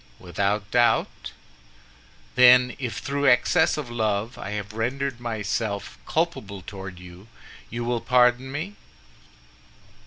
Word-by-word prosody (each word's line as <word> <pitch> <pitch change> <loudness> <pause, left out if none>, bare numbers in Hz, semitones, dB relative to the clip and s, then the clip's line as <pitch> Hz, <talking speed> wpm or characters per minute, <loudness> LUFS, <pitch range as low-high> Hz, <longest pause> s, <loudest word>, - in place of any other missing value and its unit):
"Without 100 +3 -2
doubt." 120 -1 +1 1.0
"Then 125 0 +6
if 120 -5 -4
through 140 0 -1
excess 145 +7 +4
of 140 -6 -5
love 110 0 -1
I 100 - -7
have 105 0 -5
rendered 125 +3 -2
myself 110 -3 -3
culpable 110 - -2
toward 95 -2 -8
you, 90 +3 -13 0.4
you 120 0 -4
will 120 -1 -1
pardon 125 +1 +3
me?" 155 +8 -4
120 Hz, 115 wpm, -24 LUFS, 100-125 Hz, 1.0 s, Then